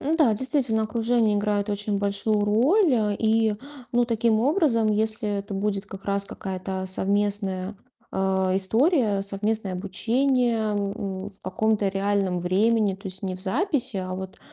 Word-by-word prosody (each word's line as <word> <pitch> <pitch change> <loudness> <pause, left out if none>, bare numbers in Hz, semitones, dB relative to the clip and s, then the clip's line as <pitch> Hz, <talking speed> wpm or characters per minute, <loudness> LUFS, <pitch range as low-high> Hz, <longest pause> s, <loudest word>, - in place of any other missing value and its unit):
Ну 305 +4 0
да, 265 -9 +4
действительно, 245 -2 0
окружение 225 -1 +1
играет 205 0 0
очень 205 0 0
большую 205 +1 +1
роль. 270 - +3 0.2
И, 220 -1 +2 0.4
ну, 240 0 +3
таким 230 -1 +1
образом, 260 - +2
если 215 +1 +1
это 200 0 -6
будет 200 0 -2
как 195 -1 -10
раз 200 0 0
какая-то 190 -1 -5
совместная, 200 0 -1 0.4
а, 190 -1 +1
история, 220 - +2
совместное 200 0 -2
обучение, 235 +6 +1 0.2
м, 200 -1 -3
в 200 - -16
каком-то 205 +2 0
реальном 195 -2 0
времени, 205 +3 +2
то 195 +1 -11
есть 185 0 -3
не 190 -1 -2
в 185 - -9
записи, 255 - -1
а 185 -1 -3
вот 190 0 -7
205 Hz, 145 wpm, -25 LUFS, 195-230 Hz, 0.4 s, да